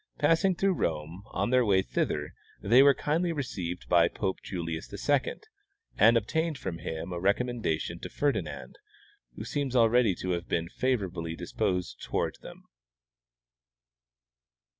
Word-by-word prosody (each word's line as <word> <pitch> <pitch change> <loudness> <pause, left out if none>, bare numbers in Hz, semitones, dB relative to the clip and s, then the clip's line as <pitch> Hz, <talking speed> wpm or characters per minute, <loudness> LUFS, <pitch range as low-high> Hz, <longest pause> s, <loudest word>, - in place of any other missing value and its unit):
Passing 165 +5 +3
through 195 +2 +2
Rome, 80 +3 -2
on 120 - -2
their 130 0 +5
Avay 95 -4 +3
thither, - - -2 0.3
they 120 +6 +5
were 140 -1 +6
kindly 170 +4 0
received 90 - -4
by 85 -1 +5
Pope 95 +1 -3
Julius 85 -3 -5
II, - - +1 0.6
and 115 +3 +6
obtained 160 +8 -1
from 85 -7 -5
him 80 +2 -5
a 85 - -3
recom 120 +5 0
mendation 85 0 -2
to - - -6
Ferdinand, 145 -1 -2 0.6
who - - -7
seems 140 -3 -2
already 115 -3 +4
to 90 - -3
have 85 -1 -2
been 85 0 -1
favorably 90 -10 -2
disposed 90 +2 -2
toward - - -2
them. - - -11
100 Hz, 140 wpm, -29 LUFS, 85-130 Hz, 0.6 s, were